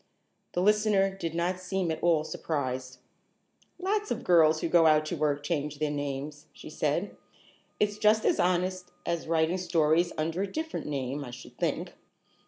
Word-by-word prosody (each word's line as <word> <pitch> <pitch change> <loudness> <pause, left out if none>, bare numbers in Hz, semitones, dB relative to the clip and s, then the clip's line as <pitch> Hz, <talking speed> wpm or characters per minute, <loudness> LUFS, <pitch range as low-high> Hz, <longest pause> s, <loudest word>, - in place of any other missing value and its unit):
The 175 - 0
listener 210 -2 +3
did 165 -4 -4
not 180 +2 0
seem 185 -2 -1
at 160 - -4
all 165 -3 +3
surprised. 130 -5 -3 0.8
"Lots 410 +3 -1
of - - -3
girls 160 -3 +5
who - - 0
go 165 -1 +5
out 155 0 +4
to 165 - -3
work 145 -2 0
change 150 -2 -2
their 150 0 -1
names," 145 +1 -4
she - - -11
said. 155 +7 -1 0.6
"It's 210 0 0
just 215 +1 +4
as - - +2
honest 180 0 0 0.2
as 170 -1 -2
writing 165 +2 +1
stories 170 -1 +2
under 165 +4 -1
a 195 -1 -2
different 320 0 -4
name, 140 0 -3
I 130 - -8
should 120 +1 -11
think." - - -1
165 Hz, 170 wpm, -29 LUFS, 150-185 Hz, 0.8 s, girls